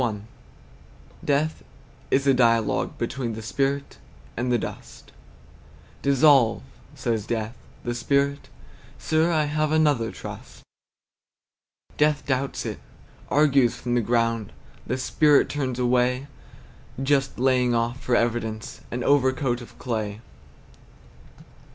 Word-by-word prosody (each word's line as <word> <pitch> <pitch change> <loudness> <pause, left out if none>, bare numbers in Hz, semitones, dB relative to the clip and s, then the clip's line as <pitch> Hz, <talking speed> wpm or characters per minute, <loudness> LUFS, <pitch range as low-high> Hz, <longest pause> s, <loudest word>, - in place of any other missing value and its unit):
Death 150 +2 0 0.5
is 135 +1 +2
a 135 - +5
dialogue 115 -3 +2
between 125 -4 -3
The 110 0 -7
spirit 140 +4 -2 0.4
and 125 +2 -1
the 120 - +4
dust. - - -8 0.9
"Dissolve," 140 - +4 0.3
says 110 -3 -2
Death. 115 0 -2 0.3
The 120 - -2
Spirit, 140 +3 0 0.5
"Sir, 160 +2 +1
I 155 -2 +2
have 155 +1 0
another 145 -8 +2
trust." - - -10 1.3
Death 150 0 +2
doubts 135 0 -1
it, - - -4 0.5
argues 140 -5 +3
from 120 -1 -3
the 120 - +3
ground. 115 -2 0 0.4
The 130 - -1
Spirit 145 +3 +3
turns 130 -4 -2
away, 125 +1 +1 0.8
Just 135 -1 +1
laying 125 -1 +2
off, 115 +2 -1
for 125 - +1
evidence, 115 -2 -2
An 125 0 -3
overcoat 130 -3 +2
of 120 - -13
clay. 110 -4 -3
125 Hz, 110 wpm, -24 LUFS, 120-140 Hz, 1.3 s, a